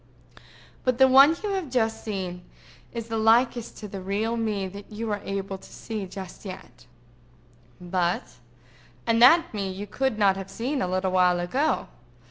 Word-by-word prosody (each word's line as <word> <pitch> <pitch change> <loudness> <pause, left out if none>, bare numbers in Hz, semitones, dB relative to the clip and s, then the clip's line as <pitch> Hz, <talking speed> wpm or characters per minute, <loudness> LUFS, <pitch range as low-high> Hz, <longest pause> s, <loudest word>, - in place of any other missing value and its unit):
"But 255 -2 +1
the 265 0 +7
one 275 +5 +7
you 420 - -1
have 380 -7 -2
just 225 -3 0
seen 185 -4 -4 0.5
is 230 -2 -5
the 225 -1 -2
likest 235 +1 +2
to 210 - -7
the 195 -1 -7
real 205 +5 -1
me 215 -4 -1
that 200 +3 -11
you 220 +1 -4
are 205 -1 -2
able 195 -1 -4
to - - -15
see 215 -4 -5
just 190 0 -9
yet—but—. 185 - -10 2.2
And 230 0 +2
that 330 +6 +6
me 200 -2 -2
you 195 +2 -6
could 265 +2 -1
not 195 -2 +3
have 195 0 -7
seen 255 +7 -2
a - - 0
little 185 +1 0
while 180 -1 +3
ago. 265 - 0
215 Hz, 165 wpm, -26 LUFS, 190-240 Hz, 2.2 s, the